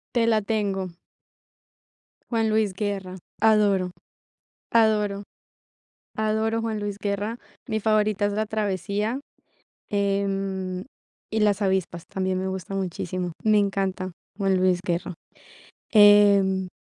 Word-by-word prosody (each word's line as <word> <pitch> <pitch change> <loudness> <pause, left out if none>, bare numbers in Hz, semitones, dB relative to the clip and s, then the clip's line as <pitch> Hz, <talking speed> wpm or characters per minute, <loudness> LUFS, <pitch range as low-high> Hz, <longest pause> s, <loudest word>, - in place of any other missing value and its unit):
Te 230 -1 +3
la 220 -2 +3
tengo. 200 -3 -1 1.4
Juan 225 -2 +1
Luis 215 -3 +1
Guerra. 195 -2 -3 0.3
Adoro, 205 -4 +3 0.8
adoro, 210 -3 +2 0.9
adoro 220 +1 0
Juan 225 -1 -2
Luis 205 -1 -4
Guerra. 205 +3 -2 0.3
Mi 220 -1 -1
favorita 215 -1 +2
es 205 - 0
La 215 +1 0
Travesía, 210 +2 -2 0.7
em, 195 -2 -1 0.5
y 220 - 0
Las 210 -1 +2
Avispas, 190 -3 0
también 185 -1 -1
me 190 - -2
gusta 190 +1 -5
muchísimo, 180 -1 -3
me 215 -1 +4
encanta 195 -2 0 0.3
Juan 195 -2 +2
Luis 185 -1 +2
Guerra. 175 +1 -2 0.8
Em 200 -3 +6
200 Hz, 110 wpm, -25 LUFS, 190-215 Hz, 1.4 s, Em